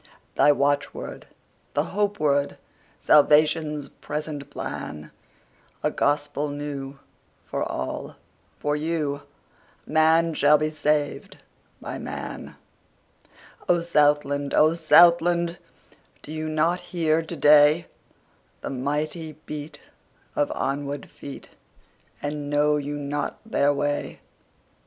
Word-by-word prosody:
The 145 - +5
watchword, 145 +1 -2 0.5
the - - +2
hope 205 0 0
word, 140 -1 +1 0.4
Salvation's 150 0 +4
present 150 -1 -6
plan?A 75 0 -7
gospel 145 0 0
new, 145 -1 -5 0.5
for - - -3
all—for 145 - -5
you:Man 160 +1 -1
shall 150 0 +5
be 155 +1 -1
saved 150 -1 -1 0.4
by - - -6
man.O 175 -1 -6
Southland! 145 -3 +2
O 155 +1 +5
Southland! 170 +1 +4 0.6
Do - - -9
you 155 0 -3
not 165 +3 +1
hear 165 -3 0
to 165 +1 -6
dayThe 150 +3 +6 0.9
mighty 150 +4 -3
beat 150 0 -7 0.5
of 145 - +1
onward 140 0 -3
feet, 140 - -10 0.7
And 145 0 -3
know 150 +1 +3
you 145 0 -4
not 145 0 -3
their 145 -10 +2
way? 145 0 -2
150 Hz, 90 wpm, -25 LUFS, 145-160 Hz, 0.9 s, dayThe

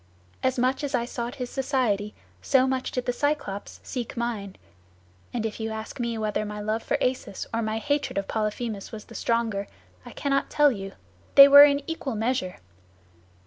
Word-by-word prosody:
As 260 0 +1
much 255 +4 +1
as 280 -2 -1
I 235 -1 0
sought 240 +1 -5
his 250 -3 -5
society, 245 -7 0 0.3
so 260 -1 +3
much 260 -1 -1
did 250 - -3
the 245 - 0
Cyclops 280 -8 -2
seek 245 -2 -5
mine; 220 -5 -3 0.8
and 230 -2 -2
if 220 0 -4
you 220 0 -2
ask 220 +2 -6
me 235 -1 -2
whether 215 -1 -1
my 210 0 -6
love 215 +2 -1
for - - -1
Acis 255 -6 -2
or 230 - 0
my 220 0 -1
hatred 285 +2 -1
of 195 - -1
Polyphemus 215 -1 -3
was 215 -2 -8
the - - -14
stronger, 225 -4 -1 0.4
I - - -10
cannot 275 -1 0
tell 295 -1 +4
you; 195 -4 -6 0.4
they 275 0 +12
were 285 +1 +11
in 285 -1 +1
equal 295 -7 -3
measure. 220 -4 -1
235 Hz, 185 wpm, -26 LUFS, 215-265 Hz, 0.8 s, they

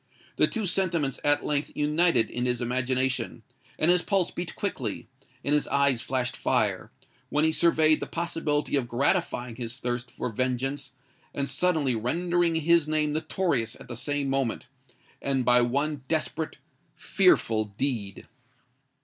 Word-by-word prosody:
The - - +5
two 225 -3 -2
sentiments 170 -7 0
at 145 0 +2
length 145 0 -1
united 150 -4 +3
in 125 +1 -2
his 125 -1 0
imagination; 130 +1 -1 0.3
and 165 - +4
his 180 0 +4
pulse 190 -1 +1
beat 175 0 -5
quickly—and 130 - -4
his 150 - +2
eyes 140 -4 +2
flashed 130 -1 -2
fire, - - 0 0.4
when 150 +1 +1
he 160 - +3
surveyed 155 -2 +3
the - - -4
possibility 165 -4 -1
of 130 -4 0
gratifying 125 -2 0
his 120 0 -5
thirst 120 -1 -3
for - - -4
vengeance 130 +4 -2 0.4
and 140 -1 -1
suddenly 150 -2 +1
rendering 170 +9 0
his 160 0 +3
name 155 -1 0
notorious 155 -7 -1
at - - -12
the 120 - -5
same 145 +3 -2
moment, 135 -4 -1 0.6
and 135 -2 0
by 125 0 +5
one 140 +4 0
desperate—fearful 115 - 0
deed! 115 -8 -3
140 Hz, 140 wpm, -27 LUFS, 125-160 Hz, 0.6 s, The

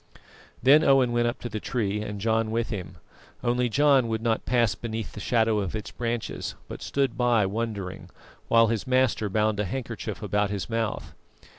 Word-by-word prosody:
Then 145 +5 +7
Owen 135 -4 +4
went 120 0 +2
up 120 - -3
to - - -4
the 110 -2 -4
tree 105 -3 -2
and 105 -1 -5
John 110 +1 +1
with 115 +1 -1
him, 90 -5 -6 0.5
only 125 0 +1
John 140 -1 +4
would 110 0 -2
not 115 -1 0
pass 120 -3 +3
beneath 115 -2 -5
the - - -9
shadow 110 0 +2
of 100 0 -3
its 105 - -5
branches; 120 -1 -3
but - - -8
stood 140 -1 0
by 120 -4 +3
wondering, 100 -2 -4 0.4
while 115 0 +5
his 115 +3 -2
master 130 -5 +2
bound 105 +1 +1
a 105 - +1
handkerchief 115 +1 -5
about 105 0 +1
his 100 -2 -3
mouth. 115 -1 -2
115 Hz, 180 wpm, -26 LUFS, 105-120 Hz, 0.5 s, Then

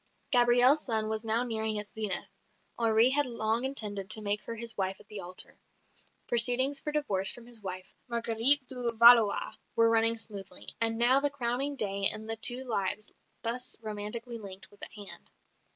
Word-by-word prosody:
Gabrielle's 245 +3 +5
sun 220 -3 0
was 220 0 -3
now 225 +2 0
nearing 220 -2 -3
its 210 0 -5
zenith; 210 -4 -1 0.5
Henri 225 +2 +3
had 290 0 +2
long 230 0 -2
intended 210 -7 -2
to 215 - 0
make 205 0 -1
her 230 - -6
his 230 0 -4
wife 190 -1 -3
at - - -19
the 210 - -8
altar; 180 0 -5 0.7
proceedings 250 +4 +3
for 300 - -5
divorce 200 -11 +5
from 240 - -7
his 235 -2 -3
wife, 185 -1 -8
Marguerite 235 +4 +1
de 245 -2 -3
Valois, 230 -2 +5 0.2
were 230 0 +3
running 230 0 +1
smoothly; 200 -4 -7
and 225 0 0
now 245 +3 +4
the 290 +1 0
crowning 275 +1 -1
day 200 -5 +1
in 215 0 -7
the 225 0 -3
two 245 +3 +3
lives 210 -3 -3 0.3
thus 245 +2 0
romantically 225 +2 -5
linked 195 -3 -9
was 205 - -22
at - - -7
hand. 205 -2 -9
230 Hz, 175 wpm, -29 LUFS, 210-245 Hz, 0.7 s, Gabrielle's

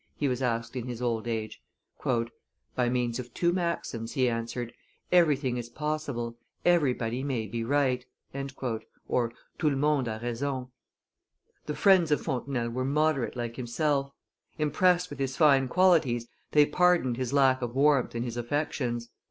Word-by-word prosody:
he 145 - 0
was 125 -1 -1
asked 115 -1 -1
in 125 -1 -4
his 120 -2 -5
old 120 -2 -1
age. 110 -2 -3 1.1
"By 125 -1 +2
means 120 -1 0
of 125 -1 -7
two 170 0 +2
maxims," 170 -10 -2
he 130 -2 +2
answered: 115 0 -3 0.4
"Everything 145 -8 +3
is 120 -1 -5
possible; 140 -5 -3 0.3
everybody 130 -8 +2
may 130 -5 -2
be 115 +2 -3
right" 130 -1 +1 0.3
(tout 130 -4 -4 0.8
le 150 -2 +3
monde 145 -2 +2
a 110 -1 -3
raison). 130 +2 -2 1.0
The 150 - -2
friends 190 -5 +5
of 150 - +3
Fontenelle 125 -2 -2
were 130 +2 -2
moderate 145 -2 +1
like 120 -1 -4
himself; 140 +3 0 0.5
impressed 180 +4 +2
with 145 - -7
his 135 -1 -2
fine 140 -4 +5
qualities, 145 -8 +3 0.3
they 150 -1 +7
pardoned 175 -8 +2
his 130 -1 -2
lack 135 -2 +4
of 120 0 -4
warmth 140 -3 +3
in 115 - -1
his 120 -1 -5
affections. 120 -2 -2
130 Hz, 150 wpm, -28 LUFS, 120-150 Hz, 1.1 s, they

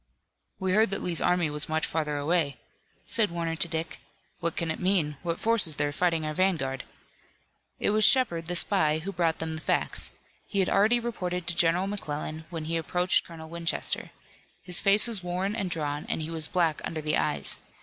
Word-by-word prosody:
"We 190 -1 -1
heard 215 +3 +4
that 195 - -2
Lee's 175 -3 +2
army 175 -3 +2
was 150 +1 -2
much 160 0 0
further 150 -2 -2
away," 145 -2 0 0.5
said 225 -2 +3
Warner 170 -1 -3
to 170 - 0
Dick. 160 0 -4 0.4
"What 170 -2 -2
can 165 -1 -2
it - - -5
mean? 180 -6 +1
What 170 -1 -3
force 225 -4 +4
is 155 - +1
there 145 +1 0
fighting 165 0 0
our 155 - -2
vanguard?" 155 -7 0 0.9
It - - +1
was 215 +1 +2
Shepard, 185 -11 +4
the 175 - -2
spy, 170 -4 +3
who 170 +5 -5
brought 170 -3 0
them 160 0 -4
the 160 - -5
facts. - - 0 0.4
He 200 - -5
had 190 -2 +2
already 215 +5 +3
reported 180 -7 -3
to 175 - 0
General 170 +2 +2
McClellan, 160 -5 -5
when 165 -3 -5
he 165 +1 -1
approached 180 +3 +1
Colonel 160 -2 -10
Winchester. 170 0 -2 0.5
His 180 0 +3
face 205 +2 +5
was 225 -5 -1
worn 185 +4 -2
and 200 -5 -2
drawn, 150 -3 -3
and - - -1
he 160 +1 -4
was 160 -1 0
black 165 -4 0
under 160 -1 -4
the 150 0 +1
eyes. - - -1
170 Hz, 200 wpm, -27 LUFS, 160-190 Hz, 0.9 s, face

